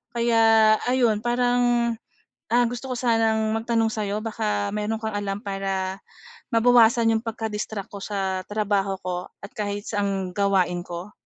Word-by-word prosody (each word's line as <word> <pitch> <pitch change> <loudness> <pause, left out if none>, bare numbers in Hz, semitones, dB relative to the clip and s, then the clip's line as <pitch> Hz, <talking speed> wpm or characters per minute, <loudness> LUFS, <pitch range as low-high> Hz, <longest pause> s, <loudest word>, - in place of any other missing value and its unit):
Kaya 225 -2 +5
ayun, 245 -4 +2
parang, 240 0 +2 0.6
ah, 245 +1 +4
gusto 245 +2 -6
ko - - -4
sanang 225 -2 +2
magtanong 225 -1 +1
sa 215 -2 -2
‘yo, 205 +2 -2
baka 105 - -1
meron 215 +1 -2
kang 220 - -2
alam 205 -1 -2
para 195 -1 -3 0.6
mabawasan 230 -1 +5
yung 220 - -1
pagka-distract 220 -2 -4
ko 200 - -7
sa 190 -2 -2
trabaho 200 -2 0
ko, 180 0 -4
at 200 - -8
kahit 205 0 -3
saang 195 -3 -2
gawain 190 -3 +1
ko? 175 +4 -7
215 Hz, 145 wpm, -24 LUFS, 195-230 Hz, 0.6 s, Kaya